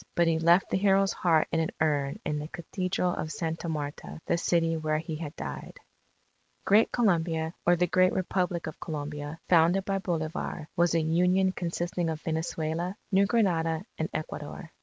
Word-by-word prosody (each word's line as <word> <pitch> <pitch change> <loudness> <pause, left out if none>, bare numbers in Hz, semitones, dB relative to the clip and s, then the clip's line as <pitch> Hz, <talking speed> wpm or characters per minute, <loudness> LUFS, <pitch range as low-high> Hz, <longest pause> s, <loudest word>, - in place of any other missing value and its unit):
But 170 - +4
he 165 -1 +2
left 170 +3 +4
the - - +2
hero's 195 0 +3
heart 165 -3 +2
in 165 - +1
an 160 - 0
urn 145 -3 +1
in 150 -1 -1
the 150 - -5
Cathedral 180 +1 -2
of 155 - -4
Santa 165 0 -3
Marta, 150 0 -5
the - - +1
city 170 -1 +1
where 155 -1 0
he 160 0 -4
had 155 -1 -6
died. - - -7 0.9
Great 210 +3 +5
Colombia, 165 -7 +1
or 175 - +6
the 175 +1 +2
Great 185 +1 +3
Republic 180 -2 -1
of 155 - -7
Colombia, 150 0 -5
founded 175 +3 +4
by 195 0 0
Bolivar, 160 -3 -3
was 170 0 +3
a 165 - +3
Union 180 +4 +3
consisting 175 -1 -2
of 160 -1 -3
Venezuela, 160 +3 -2
New 195 +1 +4
Granada, 175 -6 +1
and 160 - -1
Ecuador. 155 +1 -6
165 Hz, 170 wpm, -28 LUFS, 160-180 Hz, 0.9 s, or